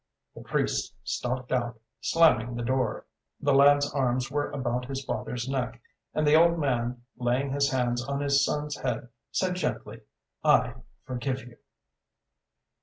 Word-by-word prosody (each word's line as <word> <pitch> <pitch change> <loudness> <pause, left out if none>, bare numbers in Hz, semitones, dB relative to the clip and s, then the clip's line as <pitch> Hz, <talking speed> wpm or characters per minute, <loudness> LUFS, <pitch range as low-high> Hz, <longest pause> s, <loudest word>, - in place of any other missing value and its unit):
The - - -10
priest - - -1
stalked 125 +1 -3
out, 120 -3 -1 0.2
slamming 120 -2 +3
the 120 - -3
door. 130 -2 0 0.3
The 145 -2 +2
lad's 145 +1 +5
arms 130 -1 0
were 145 +1 0
about 125 -2 -2
his 135 0 -4
father's 125 -1 -3
neck; 130 -3 -2 0.4
and 155 - +2
the 150 - +4
old 170 +2 +6
man, 125 -4 -1
laying 125 +3 0
his 140 0 +2
hands 120 -2 0
on 140 +2 -2
his 140 -1 +3
son's 150 +1 -1
head, 125 -1 -3 0.2
said 185 -1 0
gently: 180 - -3 0.4
"I - - +4 0.3
forgive 130 +1 -2
you." 120 -1 -14
130 Hz, 145 wpm, -28 LUFS, 120-145 Hz, 0.4 s, old